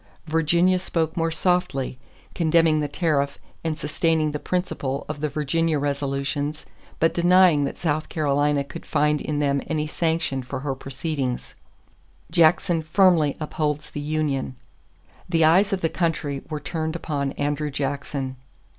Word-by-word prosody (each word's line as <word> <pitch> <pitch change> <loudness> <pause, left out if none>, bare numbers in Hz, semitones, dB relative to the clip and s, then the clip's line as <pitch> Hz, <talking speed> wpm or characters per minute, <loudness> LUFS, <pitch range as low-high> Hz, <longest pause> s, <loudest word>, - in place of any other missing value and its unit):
Virginia 170 +3 +3
spoke 165 -3 -1
more 165 -2 +1
softly, 165 -7 0 0.3
condemning 165 -2 +3
the 150 - 0
tariff 145 -3 0 0.3
and 160 -2 -1
sustaining 155 0 +1
the 150 - -3
principle 145 -7 -2
of 150 -1 -5
the 150 - 0
Virginia 155 +2 0
resolutions 140 +1 -2 0.3
but 165 - +3
denying 175 -4 +5
that - - -4
South 155 -2 -1
Carolina 145 -1 +1
could 140 - -9
find 150 -1 +1
in 150 - -2
them 140 -1 +1
any 155 -1 -1
sanction 160 -3 -1
for 125 +1 -6
her 140 -1 -2
proceedings. 135 -1 -4 0.8
Jackson 170 +1 +4
Firmly 160 -2 +3
Upholds 150 -1 -2
the - - -5
Union. 145 -3 -1 0.7
The 165 -2 +4
eyes 190 +6 +5
of 195 -2 -1
the 165 - +2
country 155 -5 -1
were 155 -1 -3
turned 160 +2 -3
upon 140 -4 -2
Andrew 145 +1 -1
Jackson. 140 -1 -3
150 Hz, 140 wpm, -24 LUFS, 140-165 Hz, 0.8 s, denying